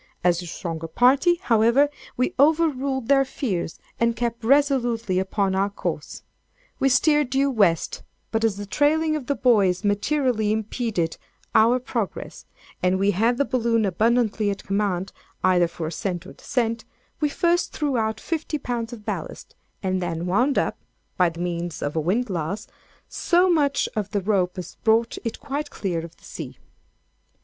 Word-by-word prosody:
As 175 -1 +3
the 175 - -6
stronger 165 -1 -5
party, 265 - +4
however, 235 +5 +4 0.3
we 255 - +1
overruled 280 -4 +2
their 275 -1 +5
fears, 205 - -3 0.2
and 235 0 +2
kept 235 0 -3
resolutely 240 -7 +2
upon 190 0 0
our 195 +1 +1
course. 200 - -5 0.6
We 270 -1 +3
steered 295 +1 +3
due 275 +1 +2
West; 195 -9 +1 0.3
but 225 0 0
as 220 -3 +1
the 205 - -5
trailing 310 +7 +2
of 280 -5 -5
the 280 - +1
buoys 210 -7 +3
materially 215 +1 +1
impeded 215 -5 -1 0.4
our 230 +3 +5
progress, 235 -5 -4 0.3
and 185 +1 +2
we 200 +1 +2
had 225 +6 +2
the 280 - +2
balloon 230 -4 +1
abundantly 215 +2 +1
at 200 -1 -4
command, 195 -2 -1 0.3
either 180 -2 +4
for 165 -1 -6
ascent 175 +2 -3
or - - -10
descent, 230 -4 -2 0.4
we 300 - +1
first 345 +3 +1
threw 290 -3 -1
out 220 -1 0
fifty 320 -1 -3
pounds 240 -4 -3
of 215 -3 -10
ballast, 195 -7 -5 0.3
and 185 -1 0
then 170 -1 -3
wound 245 +10 +2
up - - 0 0.4
(by 180 -2 +3
means 175 -1 -3
of 145 - -3
a - - +2
windlass) 195 0 -1 0.4
so 355 +1 +2
much 285 -4 +2
of 210 -2 -2
the 205 -1 -1
rope 185 -3 0
as 180 - -7
brought 225 +1 +2
it 230 - -4
quite 290 +1 -4
clear 175 -5 -3
of 170 0 -11
the - - -26
sea. - - -8
225 Hz, 160 wpm, -24 LUFS, 190-265 Hz, 0.6 s, their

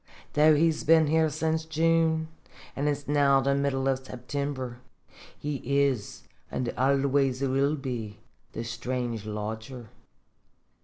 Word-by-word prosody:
Though 155 +1 +6
he's 160 +1 +2
been 160 0 +5
here 160 +1 +3
since 160 +1 -1
June, 160 0 +1 0.5
an' 140 +2 -1
it's 145 -1 -2
now 140 -1 +4
the 135 +1 +1
middle 140 -1 0
of 135 -1 0
September, 130 -1 -5 0.6
he 145 -1 -3
is, 140 -5 0 0.3
an' 125 -2 -2
always 135 0 +2
will 135 +2 +2
be, 120 -7 -5 0.4
the 115 - -4
strange 120 -1 -4
lodger. 110 +2 -6
140 Hz, 120 wpm, -27 LUFS, 125-150 Hz, 0.6 s, Though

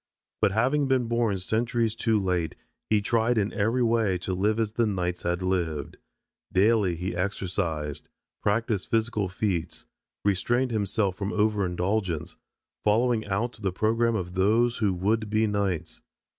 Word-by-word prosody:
But 100 - +3
having 135 +6 +2
been 130 -2 +2
born 115 -4 +1
centuries 115 +4 0
too 110 -1 +1
late 90 -4 -1 0.3
he 105 -2 +3
tried 115 +2 +2
in 105 0 0
every 115 +4 +1
way 115 -5 +2
to 95 - -1
live 105 +4 +1
as 110 -2 0
the 115 +1 +1
knights 90 -3 -2
had 85 +1 -1
lived. 85 -5 -2 0.5
Daily 100 -2 +3
he 90 +2 -4
exercised, 90 -5 -2 0.3
practiced 105 -1 0
physical 110 -4 0
feats, 95 -3 -2 0.4
restrained 120 +6 +1
himself 100 -2 0
from 100 +1 -3
over 105 -2 +1
indulgence, 90 -2 -1 0.5
following 110 +1 +2
out 110 +4 -2
the 95 -3 0
program 115 +4 +1
of 90 -4 -3
those 115 +6 +2
who 105 -4 +2
would 105 +4 0
be 110 +1 +2
knights. 100 -5 -2
105 Hz, 145 wpm, -27 LUFS, 95-115 Hz, 0.5 s, But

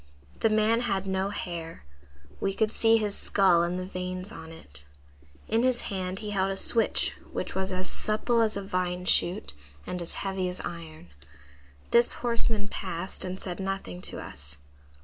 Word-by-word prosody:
The 225 - +4
man 215 +2 +4
had 195 -5 0
no 190 0 0
hair; 170 - -5 0.5
we 195 0 0
could 220 -1 +2
see 225 0 +5
his 210 -2 0
skull 190 -4 +4
and 175 +1 0
the 185 - -3
veins 185 +1 -4
on 160 - -9
it. 70 - -11 0.6
In 225 - +3
his 255 -1 +2
hand 185 -1 -2
he 210 0 -4
held 195 -1 +1
a 195 - -2
switch 225 +3 +3 0.2
which - - -3
was 190 0 -1
as 185 0 0
supple 230 +2 +2
as 220 -2 +2
a 200 - -3
vine 180 -1 -1
shoot 185 +2 +2 0.3
and 180 - -3
as 170 - -4
heavy 190 -1 0
as 180 - -3
iron. 160 - -7 0.8
This 235 0 +6
horseman 230 -3 +1
passed 185 -2 -2
and 185 0 -4
said 180 -1 -4
nothing 190 - -3
to - - -6
us. 70 +2 -7
190 Hz, 170 wpm, -28 LUFS, 180-215 Hz, 0.8 s, This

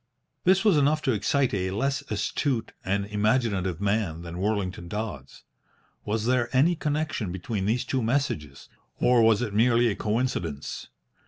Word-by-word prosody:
This 190 +3 +4
was 200 -7 +5
enough 150 +2 +2
to 135 - +2
excite 130 +4 +1
a 95 -2 -1
less 135 +8 -1
astute 115 +4 -1
and 100 +1 0
imaginative 105 -4 0
man 100 -5 -1
than 85 +1 -7
Worlington 95 -4 -2
Dodds. 105 - -6 0.6
Was 110 +1 -1
there 120 -1 +1
any 165 +7 +4
connection 150 - -2
between 95 +2 -3
these 120 +3 0
two 130 - -1
messages, 110 - -2 0.3
or 125 -1 +4
was 115 +1 +4
it 110 -4 -4
merely 120 +2 +4
a 100 - -1
coincidence? 105 - -2
110 Hz, 150 wpm, -26 LUFS, 95-130 Hz, 0.6 s, was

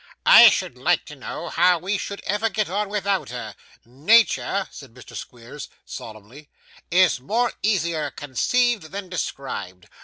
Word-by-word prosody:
'I - - +10
should - - -3
like - - +1
to - - -11
know - - -7
how 180 +1 +3
we 185 +5 -3
should 200 - -6
ever 210 +3 0
get 215 0 -1
on 205 +2 -2
without 200 -2 -1
her. 120 -4 -7 0.3
Natur,' 195 - +2
said 130 -5 -13
Mr. 125 - -13
Squeers, 120 +4 -9 0.2
solemnly, 115 +7 -11 0.4
'is 180 -5 +3
more 230 - -1
easier 170 -7 0
conceived 220 - 0
than 195 -1 -7
described. 100 - -5
175 Hz, 145 wpm, -23 LUFS, 130-205 Hz, 0.4 s, I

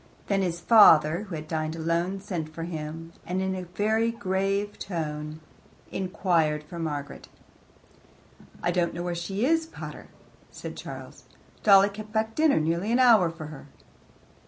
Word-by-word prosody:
Then 195 -1 +1
his 175 -2 -1
father, 170 -3 +6
who 175 - -4
had 155 0 -7
dined 155 0 -2
alone, 170 +4 -1
sent 175 -6 -4
for 165 +1 -6
him, 165 0 -6
and 180 +1 -2
in 190 -1 -2
very 220 +2 +2
grave 195 -1 -1
tones 155 -4 -4 0.5
inquired 170 -5 0
for 170 +3 -9
Margaret. 145 -3 -5 1.4
"I 175 - +2
don't 175 -1 0
know 175 - -4
where 175 0 -2
she 195 +6 -2
is, 325 +2 +2
pater," - - -9 0.4
said - - -8
Charles. - - -9 0.4
"Dolly 200 -1 +7
kept 215 +1 -9
back 220 0 0
dinner 310 - +3
nearly 170 +7 0
an 240 - +3
hour 230 -9 +6
for 165 -1 -8
her." 145 - -11
180 Hz, 150 wpm, -27 LUFS, 160-205 Hz, 1.4 s, Dolly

